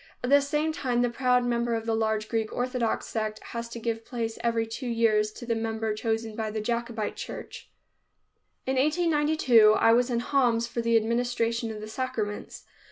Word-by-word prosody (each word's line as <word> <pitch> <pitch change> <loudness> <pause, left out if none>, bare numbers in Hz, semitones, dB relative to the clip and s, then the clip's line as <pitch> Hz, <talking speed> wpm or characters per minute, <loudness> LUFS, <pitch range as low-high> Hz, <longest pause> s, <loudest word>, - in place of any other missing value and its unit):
At 250 - -1
the 285 0 +7
same 300 +3 0
time 245 -5 0
the 245 - +1
proud 250 0 +2
member 235 -1 0
of 225 0 -3
the 225 - 0
large 220 -1 0
Greek 225 -1 -1
Orthodox 245 -2 -1
sect 215 -1 -3 0.2
has 235 0 -4
to 235 - -7
give 225 0 -3
place 225 -2 -4
every 230 -1 +1
two 225 +3 -6
years 220 -2 +2
to - - -9
the 235 - 0
member 225 -1 -2
chosen 225 0 -2
by 220 -1 -2
the 215 +1 -3
Jacobite 235 -1 -2
church. - - -8 1.0
In 265 0 0
1892 295 -7 +4
I 225 +1 +4
was 245 +2 +3
in 235 -1 0
Homs 245 -3 +2
for 235 0 -3
the 230 0 +3
administration 230 0 0
of 215 -1 -6
the 215 - -7
sacraments. 220 -3 -4
230 Hz, 185 wpm, -27 LUFS, 225-245 Hz, 1.0 s, the